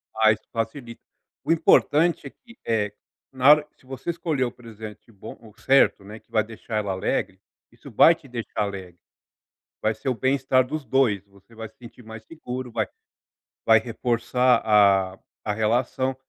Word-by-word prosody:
Ah, 110 Hz, 0 st, +5 dB
isso 105 Hz, -, -4 dB
facilita. 115 Hz, +1 st, -5 dB, 0.4 s
O 150 Hz, -, -1 dB
importante 160 Hz, -1 st, +3 dB
é -, -, -8 dB
que, 240 Hz, -, -20 dB
eh, 105 Hz, -3 st, -1 dB, 0.4 s
na 130 Hz, +1 st, +3 dB
hora, 150 Hz, 0 st, +6 dB
se -, -, -26 dB
você 135 Hz, +5 st, -7 dB
escolher 165 Hz, -5 st, -1 dB
o 120 Hz, -, -2 dB
presente 110 Hz, -2 st, -12 dB
bom 100 Hz, -, -11 dB
ou 110 Hz, -2 st, -16 dB
certo, 135 Hz, -3 st, +3 dB
né, 105 Hz, +3 st, -10 dB
que -, -, -37 dB
vai 110 Hz, -2 st, +2 dB
deixar 110 Hz, 0 st, -6 dB
ela 105 Hz, -2 st, -2 dB
alegre, 95 Hz, 0 st, -2 dB, 0.3 s
isso 120 Hz, +4 st, -14 dB
vai 135 Hz, +7 st, +6 dB
te 160 Hz, -4 st, -15 dB
deixar 120 Hz, -4 st, -5 dB
alegre. 95 Hz, -4 st, -7 dB, 0.8 s
Vai 110 Hz, +1 st, +1 dB
ser -, -, -4 dB
o -, -, +1 dB
bem-estar 130 Hz, 0 st, +1 dB
dos 150 Hz, +2 st, -5 dB
2, 115 Hz, -8 st, +1 dB
você 100 Hz, +3 st, -22 dB
vai 110 Hz, 0 st, -7 dB
se 110 Hz, -, -25 dB
sentir 125 Hz, 0 st, -14 dB
mais 110 Hz, 0 st, -10 dB
seguro, 130 Hz, -5 st, -7 dB
vai 110 Hz, -2 st, -1 dB, 0.8 s
vai 110 Hz, -1 st, +6 dB
reforçar 125 Hz, +1 st, +1 dB
a 100 Hz, -3 st, +4 dB, 0.3 s
a 105 Hz, -, -2 dB
relação. 120 Hz, +4 st, 0 dB
115 Hz, 175 wpm, -24 LUFS, 110-130 Hz, 0.8 s, hora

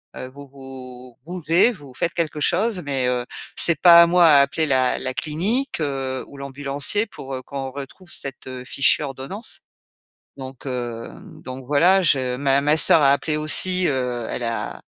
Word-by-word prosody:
Heu, 130 Hz, -, -7 dB
vous 140 Hz, +2 st, -13 dB
vous 130 Hz, -2 st, -13 dB
bougez, 175 Hz, +5 st, +1 dB
vous 145 Hz, -, -14 dB
faites 170 Hz, +5 st, -2 dB
quelque 155 Hz, -3 st, -3 dB
chose, 190 Hz, +5 st, 0 dB
mais, 135 Hz, -3 st, -1 dB
heu, 125 Hz, -1 st, -2 dB, 0.3 s
c'est 165 Hz, -4 st, +2 dB
pas 170 Hz, -1 st, +8 dB
à -, -, +4 dB
moi 175 Hz, 0 st, +4 dB
à 145 Hz, -3 st, +6 dB
appeler 150 Hz, +3 st, -1 dB
la 130 Hz, -2 st, +1 dB
la 130 Hz, -, -4 dB
clinique, 200 Hz, -, -2 dB
heu, 135 Hz, -3 st, -3 dB
ou 140 Hz, -, -14 dB
l'ambulancier 140 Hz, +9 st, 0 dB
pour, 135 Hz, -8 st, -10 dB
heu, 130 Hz, -, -5 dB
qu'on 135 Hz, 0 st, -7 dB
retrouve 140 Hz, +7 st, -11 dB
cette, 135 Hz, -1 st, -3 dB
heu, 130 Hz, -1 st, -8 dB
fichue 140 Hz, +3 st, +2 dB
ordonnance». 135 Hz, -, -3 dB, 0.8 s
Donc 130 Hz, 0 st, -10 dB
heu, 120 Hz, -3 st, -5 dB, 0.3 s
donc 130 Hz, 0 st, -9 dB
voilà, 170 Hz, +8 st, +3 dB
je 130 Hz, -5 st, +1 dB
ma 140 Hz, 0 st, +1 dB
ma 150 Hz, +2 st, +2 dB
sœur 160 Hz, 0 st, +6 dB
a 135 Hz, -, +5 dB
appelé 150 Hz, +2 st, -1 dB
aussi, 180 Hz, +4 st, +3 dB
heu, 125 Hz, -3 st, -3 dB
elle 125 Hz, -, -5 dB
a 115 Hz, -1 st, -5 dB
140 Hz, 175 wpm, -21 LUFS, 130-165 Hz, 0.8 s, pas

